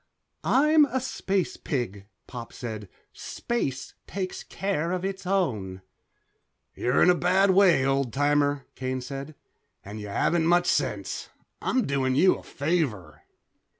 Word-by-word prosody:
"I'm 300 +2 +5
a 260 -2 -2
space 195 -7 -2
pig," 105 - -3 0.2
Pop 120 -2 -8
said. 110 -5 -6 0.2
"Space 140 - -3
takes 190 -2 -4
care 175 -4 -2
of 185 0 -2
its 195 -1 -4
own." 105 - -1 0.9
"You're 125 +2 +2
in 180 - +7
a - - +5
bad 185 +3 +3
way, 185 -8 +5
old 135 -2 +1
timer," 145 +1 +1
Kane 130 0 -3
said, 140 +3 -7 0.5
"and 105 +2 -7
you 105 - -6
haven't 160 +11 +1
much 175 +1 +4
sense. - - -1 0.3
I'm 255 - +1
doing 135 -2 0
you 185 +7 +5
a - - -8
favor." 145 - -2
145 Hz, 135 wpm, -26 LUFS, 130-185 Hz, 0.9 s, in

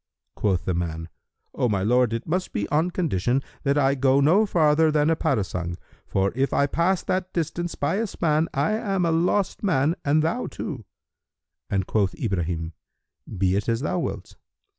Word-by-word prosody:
Quoth 95 -4 0
the 95 - 0
man, 80 -1 -3 0.4
"O 125 - 0
my 100 -3 0
lord, 125 +2 +3
it 115 +2 -3
must 180 +3 -2
be 100 - -1
on 155 +4 +2
condition 135 - 0 0.2
that 140 0 +1
I 135 -1 +3
go 135 0 +3
no 180 +10 +4
farther 160 -3 +3
than 150 +1 +2
a - - +3
parasang; 90 - -2 0.3
for 95 0 +1
if 135 +2 0
I 140 - +3
pass 170 +5 +1
that 185 0 -2
distance 170 +1 -2
by 145 +7 0
a 225 +1 0
span, 160 -3 0
I 145 +4 0
am 195 -4 0
a 165 - +2
lost 180 +4 +1
man, 160 -6 +2
and 150 +2 +2
thou 170 +10 -1
too." 130 - -6 0.8
And 95 -2 0
quoth 100 -2 0
Ibrahim, 85 -6 -2 0.6
"Be 95 0 +2
it 100 +3 -1
as 115 +1 0
thou 150 +4 -1
wilt." 100 - -5
140 Hz, 180 wpm, -24 LUFS, 100-165 Hz, 0.8 s, no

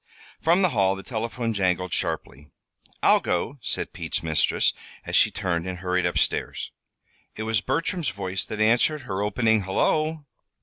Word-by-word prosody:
From 175 +4 +4
the 185 - +4
hall 95 - +2
the 95 - -8
telephone 115 +1 -3
jangled 90 -3 0
sharply. 70 +4 -3 0.6
"I'll - - +6
go," 120 +11 -2
said - - -2
Pete's - - -3
mistress, 80 -1 +2 0.3
as - - -2
she - - +6
turned 85 -1 -2
and 90 -1 -4
hurried 90 0 0
up 90 - -2
stairs. - - -1 0.6
It 110 - -4
was 110 -2 +1
Bertram's 160 +3 -1
voice 95 -6 -3
that 110 - -5
answered 120 +8 +3
her 95 -4 -3
opening 110 +1 +2
"Hullo." 155 - 0
105 Hz, 160 wpm, -25 LUFS, 95-130 Hz, 0.6 s, I'll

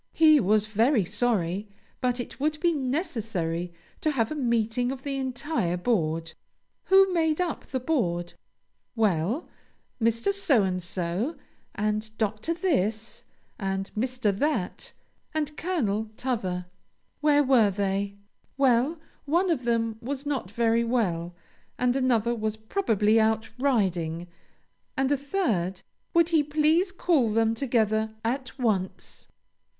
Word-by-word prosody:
He 310 -2 +6
was 210 0 +3
very 220 +1 +2
sorry, 205 -2 -1 0.3
but 250 -1 0
it 245 - -6
would 305 +2 0
be 345 0 +2
necessary 225 - -2 0.3
to 310 - +2
have 240 -5 0
a - - -2
meeting 240 -2 0
of 265 -1 -7
the 280 -1 -3
entire 260 - -1
board. 165 -6 0 0.5
Who 385 0 +5
made 320 -2 +1
up 350 -4 -2
the 260 - -2
board? 175 - -1 0.6
Well, 215 - +1 0.5
Mr. 230 - +2
So 300 - +3
and 185 -1 -1
so, 180 - -2 0.4
and 215 +1 -1
Dr. 220 +9 -1
This, 225 - -1 0.4
and 195 -1 -2
Mr. 240 -3 0
That, 285 -6 -2 0.4
and 300 -1 -1
Colonel 220 - -1
'Tother. 190 -9 -2 0.5
Where 295 -1 +4
were 250 -6 +5
they? 200 0 -1 0.4
Well, 270 +4 +3 0.3
one 345 +5 +2
of 255 -7 -1
them 230 -2 0
was 275 +3 -4
not 270 -10 -2
very 230 +2 +2
well, 180 -8 -1 0.4
and 250 0 +2
another 240 -3 +2
was 220 -1 -2
probably 220 - +2
out 220 0 +1
riding, 180 - 0 0.7
and 270 +1 +1
a - - +5
third 230 - -1 0.3
Would 335 0 +5
he 325 -3 +4
please 310 +5 +2
call 315 - +2
them 225 +1 +2
together 220 -3 0
at 255 +3 -2
once? 210 -7 -2
230 Hz, 130 wpm, -27 LUFS, 205-285 Hz, 0.7 s, He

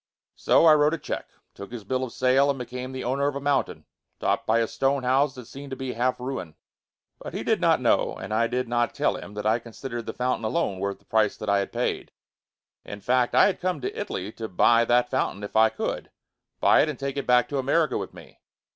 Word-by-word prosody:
So, - - +4
I 160 - +8
wrote 150 +1 +3
a - - -6
check, - - -5 0.3
took 100 +2 -10
his 120 -3 -7
bill 130 +5 -1
of 125 - -5
sale 130 +2 +3
and 140 - 0
became 125 +1 -6
the 130 -1 -5
owner 135 +3 0
of 145 - -2
a - - -2
mountain, 140 0 -1 0.3
topped - - 0
by 110 - +3
a 115 -1 +2
stone 135 +2 0
house 135 +2 +2
that 125 -2 -9
seemed 140 +4 -10
to 130 - -4
be 130 -1 -4
half 125 +2 0
ruin. 125 - -5 0.6
But - - -8
he - - -3
did - - +1
not - - +4
know, - - +2
and 100 +3 -6
I 115 +2 +2
did 125 +1 -2
not 120 0 0
tell - - +1
him 105 - -9
that 105 0 -5
I 110 +2 +3
considered 120 0 -7
the - - -3
fountain 125 -1 -1
alone 110 - -1
worth 100 0 -2
the - - -31
price 110 -2 +1
that 110 - -5
I 100 0 +3
had 100 - -3
paid. - - -2 0.7
In 100 - -8
fact, 125 +3 +1
I - - +7
had 200 - 0
come 180 0 -1
to 395 - -4
Italy 105 - -4
to 110 0 -6
buy 115 +4 +4
that 125 +1 +2
fountain 115 -6 -1
if 100 - -7
I 110 0 +6
could; 110 - -4 0.5
buy - - +5
it 155 - +1
and 150 - -4
take 140 0 -4
it 140 - -4
back 125 0 +4
to 140 - -1
America 150 +4 +1
with - - -3
me. - - -15
125 Hz, 245 wpm, -25 LUFS, 110-135 Hz, 0.7 s, I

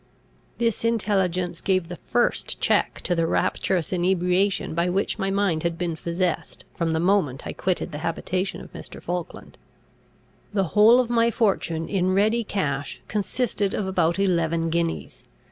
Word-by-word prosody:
This 230 -2 0
intelligence 190 -6 0
gave 185 -3 +1
the 175 - -6
first 240 +7 0
check - - +1
to 180 - 0
the 165 -1 +1
rapturous 175 0 0
inebriation 180 +2 +1
by 170 +2 +1
which 195 +4 -1
my 195 -1 0
mind 195 -5 +1
had 170 0 -1
been 175 -2 -2
possessed 170 +2 -2
from 165 -1 -1
the 160 0 +1
moment 170 -7 +1
I - - -4
quitted 185 -1 -1
the 150 - -5
habitation 180 +3 -2
of - - -13
Mr. - - -9
Falkland. 175 -1 -6 0.9
The 195 -5 +1
whole 220 +4 +7
of 245 -2 0
my 230 -1 +4
fortune 190 -8 0
in 185 -1 +1
ready 220 +4 +3
cash 145 -10 -2
consisted 205 -1 -1
of 205 - -1
about 175 -3 +1
eleven 170 -4 +1
guineas. 170 0 -2
185 Hz, 155 wpm, -24 LUFS, 170-200 Hz, 0.9 s, whole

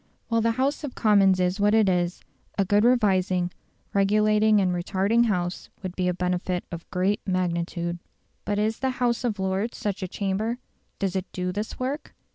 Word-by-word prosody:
While 230 -1 +2
the 230 +1 +2
House 275 +5 0
of 280 -4 -5
Commons 195 -4 +4
is 180 +2 +1
what 205 +1 +4
it 220 -2 +4
is, 175 -1 0 0.3
a 195 - +2
good 205 +2 +3
revising, 190 -7 +2 0.4
regulating 210 +1 +4
and 185 -2 +2
retarding 195 +6 +1
House 180 -4 -2
would 185 -1 -5
be 180 -1 0
a 180 - +2
benefit 180 0 -1
of 170 -1 -8
great 190 +3 0
magnitude. 175 -1 -1 0.4
But 205 - -1
is 215 +2 0
the 265 - 0
House 240 0 +1
of 225 -4 -1
Lords 190 +4 -1
such 205 -1 -3
a 185 - -2
chamber? 205 +5 -2 0.4
Does 195 -1 -2
it 190 0 -3
do 180 0 -2
this 210 +3 -4
work? 270 +4 -4
195 Hz, 180 wpm, -25 LUFS, 180-220 Hz, 0.4 s, Commons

